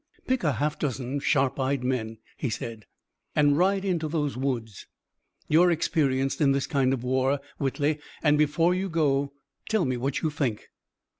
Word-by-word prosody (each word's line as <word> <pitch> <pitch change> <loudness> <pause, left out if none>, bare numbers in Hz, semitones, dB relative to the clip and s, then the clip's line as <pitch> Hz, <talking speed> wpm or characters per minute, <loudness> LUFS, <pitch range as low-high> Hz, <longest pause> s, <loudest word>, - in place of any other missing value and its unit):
"Pick 260 -4 0
a 150 -4 +2
half 150 +6 -1
dozen 135 -1 -2
sharp 140 -2 +1
eyed 135 -1 0
men," 115 -3 -2 0.2
he 135 - -3
said, 115 -2 -6 0.5
"and 145 -1 +4
ride 195 +4 +2
into 170 -5 0
those 150 -2 -1
woods. 120 -6 -3 0.6
You're 170 +4 +5
experienced 140 -5 +1
in 140 -2 +4
this 135 0 0
kind 135 -5 +1
of 130 -3 -2
war, 130 +2 +1 0.2
Whitley, 145 +2 0 0.2
and 150 -2 +5
before 150 +4 +3
you 190 +1 -2
go 140 -4 +1 0.4
tell 215 -6 +2
me 130 -1 -1
what 140 +5 -2
you 155 - +1
think." 130 -8 -2
140 Hz, 165 wpm, -26 LUFS, 130-155 Hz, 0.6 s, You're